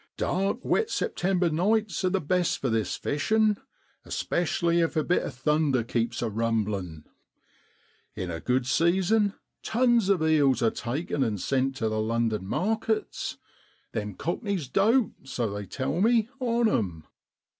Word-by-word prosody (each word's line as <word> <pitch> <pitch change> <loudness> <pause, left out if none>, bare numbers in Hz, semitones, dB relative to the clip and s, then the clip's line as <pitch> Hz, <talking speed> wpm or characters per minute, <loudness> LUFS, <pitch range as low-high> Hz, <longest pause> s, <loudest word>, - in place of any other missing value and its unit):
Dark, 195 +7 -1
wet 445 +1 +1
September 180 - 0
nights 200 +4 +1
are 185 - +3
the 195 +1 +1
best 180 +2 +1
for 130 - -2
this 110 -2 0
fishin', 215 +8 +1 0.5
especially 170 0 0
if 165 0 +1
a 155 - +2
bit 180 - +2
of 135 - -6
thunder 140 -1 +1
keeps 120 +1 -1
a 115 - 0
rumblin'. 105 -7 -2 1.1
In 90 -2 -4
a 80 - -4
good 125 +7 0
season 190 - +2 0.3
tons 235 -3 +2
of 185 -5 +3
eels 145 -5 +3
are 115 - +3
taken 140 +3 -2
an' 110 -4 -1
sent 135 +7 0
tu 115 -4 -1
the 110 0 -1
London 110 -3 -1
markets. 220 - -1 0.5
Them 105 -2 -4
cockneys 180 - -2
dote, 220 - +3
so 125 -5 -2
they 100 -1 -5
tell 140 - -2
me, 225 0 +3
on 235 -2 +2
'em.' 90 - -1
155 Hz, 145 wpm, -27 LUFS, -, 1.1 s, are